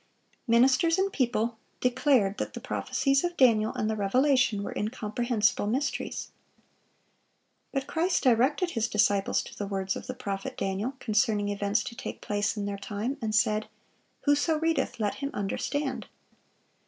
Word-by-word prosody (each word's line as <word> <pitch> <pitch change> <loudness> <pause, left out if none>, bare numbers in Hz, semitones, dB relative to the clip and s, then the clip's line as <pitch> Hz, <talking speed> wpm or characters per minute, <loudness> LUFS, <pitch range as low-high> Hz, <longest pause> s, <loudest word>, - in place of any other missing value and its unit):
Ministers 260 +8 +4
and 390 +1 0
people 235 -3 0 0.2
declared 250 -5 +2
that - - -4
the - - -4
prophecies 275 -1 0
of 350 0 -2
Daniel 220 -4 +4
and 215 - -1
the 220 - 0
Revelation 245 +1 +2
were - - -5
incomprehensible 215 0 0
mysteries. 260 +7 -2 1.4
But 275 -1 -2
Christ 345 +3 0
directed 270 +8 +3
His 230 -4 0
disciples 205 -2 +2
to - - -11
the 205 - -4
words 195 -1 -2
of - - -7
the 255 - -4
prophet 195 -4 -5
Daniel 195 +7 -2
concerning 215 -2 +1
events 205 +1 0
to 235 - -7
take - - -6
place 205 +1 -1
in 205 - -2
their 200 0 -4
time, 210 +7 -3
and 215 -1 -1
said, 215 0 +2 0.5
"Whoso 290 +2 +2
readeth, 320 -6 0
let 210 -2 0
him 280 - -1
understand." 260 +7 -2
230 Hz, 150 wpm, -28 LUFS, 205-270 Hz, 1.4 s, Ministers